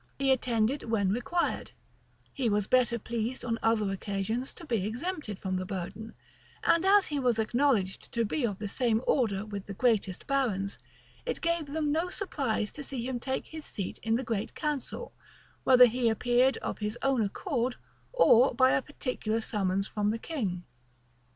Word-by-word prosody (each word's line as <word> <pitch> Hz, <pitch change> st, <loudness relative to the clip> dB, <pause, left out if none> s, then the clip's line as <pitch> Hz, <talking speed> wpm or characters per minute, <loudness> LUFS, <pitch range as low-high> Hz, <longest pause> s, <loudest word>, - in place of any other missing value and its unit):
He 275 Hz, -1 st, +2 dB
attended 245 Hz, +1 st, +1 dB
when 200 Hz, -4 st, +2 dB
required: 290 Hz, -, -1 dB, 0.6 s
he 255 Hz, -4 st, 0 dB
was 205 Hz, -1 st, +1 dB
better 245 Hz, 0 st, +3 dB
pleased 235 Hz, +3 st, -3 dB
on 230 Hz, -1 st, -1 dB
other 215 Hz, -3 st, +2 dB
occasions 200 Hz, +6 st, -2 dB
to 340 Hz, -, -10 dB
be 230 Hz, -9 st, 0 dB
exempted 240 Hz, -, -3 dB
from 190 Hz, -1 st, -2 dB
the 185 Hz, -, -2 dB
burden: 195 Hz, +4 st, -6 dB, 0.5 s
and 335 Hz, -, +4 dB
as 405 Hz, 0 st, +6 dB
he 295 Hz, -2 st, -1 dB
was 245 Hz, -4 st, +2 dB
acknowledged 225 Hz, -4 st, +1 dB
to 235 Hz, -1 st, +1 dB
be 280 Hz, +6 st, -2 dB
of 205 Hz, -5 st, 0 dB
the 210 Hz, -, -4 dB
same 230 Hz, +1 st, +1 dB
order 215 Hz, -6 st, +1 dB
with 200 Hz, -2 st, -6 dB
the 200 Hz, -, -6 dB
greatest 210 Hz, -5 st, +1 dB
barons, 220 Hz, -8 st, 0 dB, 0.4 s
it 485 Hz, -, -3 dB
gave 335 Hz, -2 st, 0 dB
them 300 Hz, 0 st, -1 dB
no 330 Hz, +4 st, 0 dB
surprise 270 Hz, -, -2 dB
to 290 Hz, -, -7 dB
see 255 Hz, -3 st, -4 dB
him 255 Hz, -2 st, -2 dB
take 265 Hz, +2 st, -2 dB
his 315 Hz, -1 st, -8 dB
seat 195 Hz, -9 st, -5 dB
in 225 Hz, +1 st, +1 dB
the 255 Hz, -, -1 dB
great 225 Hz, -3 st, -3 dB
council, 300 Hz, -, -3 dB, 0.5 s
whether 250 Hz, -1 st, +9 dB
he 245 Hz, 0 st, +1 dB
appeared 245 Hz, +4 st, +3 dB
of -, -, -3 dB
his 210 Hz, +2 st, -3 dB
own 270 Hz, -3 st, +2 dB
accord, 245 Hz, -, -1 dB, 0.4 s
or 270 Hz, -, +5 dB
by 260 Hz, -1 st, +5 dB
a -, -, +3 dB
particular 250 Hz, -6 st, -2 dB
summons 195 Hz, -3 st, 0 dB
from 210 Hz, -1 st, -1 dB
the 220 Hz, -, 0 dB
king. 210 Hz, -, -3 dB
235 Hz, 175 wpm, -29 LUFS, 210-270 Hz, 0.6 s, whether